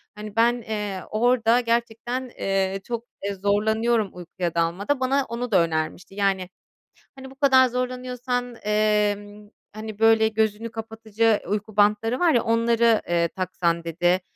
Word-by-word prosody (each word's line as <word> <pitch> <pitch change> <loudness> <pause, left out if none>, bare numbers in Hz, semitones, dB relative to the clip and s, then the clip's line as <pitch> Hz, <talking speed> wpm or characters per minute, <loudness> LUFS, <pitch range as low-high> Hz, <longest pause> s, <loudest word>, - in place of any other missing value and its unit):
Hani, 210 0 -9
ben, 235 +1 +4
eee, 210 -3 -4
orada 235 +1 +3
gerçekten, 235 +2 -2
eee, 195 0 0
çok 235 +1 -5 0.4
zorlanıyorum 220 +2 +1
uykuya 175 -1 -5
dalmada. 185 +11 0
Bana 270 +1 +1
onu 235 +1 -4
da 190 - +5
önermişti. 165 +4 -3
Yani, 195 -2 0 0.7
hani, 265 0 -11
bu - - -15
kadar 265 -2 +5
zorlanıyorsan, 250 0 -3
eee, 210 -1 +2 0.6
hani, 215 -1 -7
böyle 225 0 +5
gözünü 220 +1 -1
kapatıcı 225 -1 -1
uyku 210 +1 -3
bantları 210 +4 +2
var 345 -2 +4
ya, 240 - +3
"Onları, 230 0 +3
eee, 170 -1 +2
taksan." 170 -2 -2
dedi. 175 +2 +1
220 Hz, 135 wpm, -24 LUFS, 200-240 Hz, 0.7 s, da